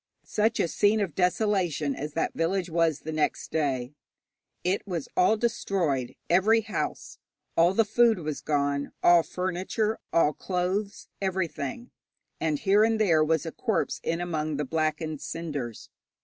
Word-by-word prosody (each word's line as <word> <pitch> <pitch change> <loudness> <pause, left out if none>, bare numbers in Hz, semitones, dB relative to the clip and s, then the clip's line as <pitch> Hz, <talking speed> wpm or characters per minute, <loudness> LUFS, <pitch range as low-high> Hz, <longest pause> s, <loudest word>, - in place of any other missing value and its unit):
Such 220 +2 +1
a - - +2
scene 205 +5 +2
of 195 -7 -1
desolation 180 -6 +1
as 150 +1 -5
that 165 - -1
village 175 +2 -1
was 165 -3 +1
next 155 -1 -1
day! 135 -4 -1 0.7
It 185 +3 +1
was 170 -6 -3
all 215 +5 +4
destroyed 190 - -1
every 210 +6 +4
house. 220 - -4 0.4
All 175 +3 +4
the 225 - +4
food 230 +1 +4
was 155 -4 -4
gone, 140 -1 -1
all 175 -1 +7
furniture, 185 +5 -2
all 155 -2 +3
clothes, 190 +4 -2
everything, 190 - -3 0.5
and 155 -2 0
here 200 +6 +4
and 225 0 +2
there 165 -7 +4
was 160 0 +1
a 165 - -4
corpse 220 +3 -1
in 165 +1 -1
among 155 -4 -2
the 150 - -1
blackened 155 +1 -2
cinders. 145 -9 -5
170 Hz, 145 wpm, -27 LUFS, 155-200 Hz, 0.7 s, all